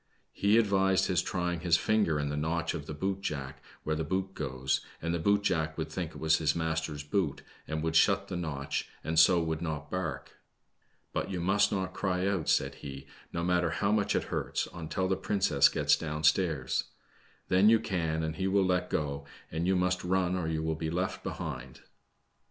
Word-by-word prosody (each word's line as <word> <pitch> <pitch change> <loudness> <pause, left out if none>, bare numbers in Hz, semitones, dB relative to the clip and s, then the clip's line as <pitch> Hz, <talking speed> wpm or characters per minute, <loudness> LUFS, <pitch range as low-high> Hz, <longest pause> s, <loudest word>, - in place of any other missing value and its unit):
He 100 +2 +3
advised 95 -3 +3
his 90 -2 +2
try 90 -1 -1
ing 85 - -3
his 85 0 +3
finger 105 -8 +2
in 75 0 -1
the 75 - -2
notch 80 +2 -1
of 75 - -6
the 75 - -5
boot 95 +5 -2
jack 70 -5 -4 0.2
where 80 - -1
the 80 - -1
boot 95 +4 -2
goes, 65 -5 -1 0.2
and 85 +1 -2
the 85 - 0
boot 100 +4 +2
jack 80 -5 0
would - - -3
think - - -3
it - - -10
was 80 0 +3
his 75 -2 +1
master's 80 -2 -2
boot 75 -1 -1 0.2
and 80 0 -3
would 80 0 -1
shut - - +4
the - - -5
notch, 75 -6 -3
and 80 0 +1
so 85 +2 +6
would 80 0 -2
not 80 -4 -4
bark. 95 0 -4 0.8
But - - -2
you 95 -2 -3
must 100 +4 +3
not 95 -2 -2
cry 95 -1 -1
out," 100 -5 0
said - - +2
he, 70 -1 -7 0.3
no 85 - -2
matter 90 -1 +2
how 100 +5 0
much 105 -2 +2
it - - +1
hurts, - - -1
until 90 +2 -2
the 95 - +1
princess 95 -7 +3
gets - - +3
down 75 -1 -4
stairs. 80 -4 +2 0.6
Then 95 +3 +5
you 115 0 +6
can, 80 -7 -1
and 80 0 -3
he 95 - 0
will 95 -1 +3
Tet 90 0 +1
go, 70 -2 -2 0.2
and 80 +3 -1
you 95 - +3
must 90 0 +1
run 90 0 +1
or 90 -3 -2
you 80 -1 -1
will 80 0 0
be 80 0 -3
left 90 +3 -2
behind." 65 0 -5
BLAQK - - -18
SNEID. - - -28
85 Hz, 210 wpm, -30 LUFS, 80-95 Hz, 0.8 s, so